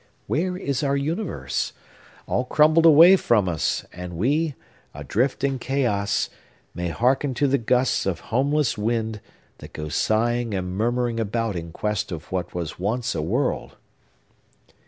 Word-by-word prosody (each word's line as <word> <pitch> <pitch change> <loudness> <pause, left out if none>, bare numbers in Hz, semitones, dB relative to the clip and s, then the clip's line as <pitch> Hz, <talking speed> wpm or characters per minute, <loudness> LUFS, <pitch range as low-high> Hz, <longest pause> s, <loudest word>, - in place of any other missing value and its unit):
Where 180 +4 -1
is 140 -8 -2
our 140 -1 +1
universe? 155 - -2 0.5
All 125 - 0
crumbled 155 +5 +4
away 165 +4 +9
from 110 - +2
us; 85 -3 -1
and 90 -1 -7
we, 145 - +1 0.4
adrift 110 - -1
in 135 -2 0
chaos, 120 -7 0 0.5
may 90 +1 -3
hearken 130 - +1
to 145 - +2
the 140 0 +2
gusts 125 -1 +1
of 95 - -1
homeless 140 -1 +1
wind, 110 -1 -1 0.4
that - - -12
go 75 0 -5
sighing 115 +4 0
and 90 -1 -3
murmuring 120 +2 0
about 115 -1 -1
in 85 -1 -5
quest 105 +3 -2
of 80 -3 -7
what 90 -2 -3
was 85 -3 -4
once 115 +5 -1
a 80 - -2
world! 120 - -1
120 Hz, 145 wpm, -24 LUFS, 95-140 Hz, 0.5 s, away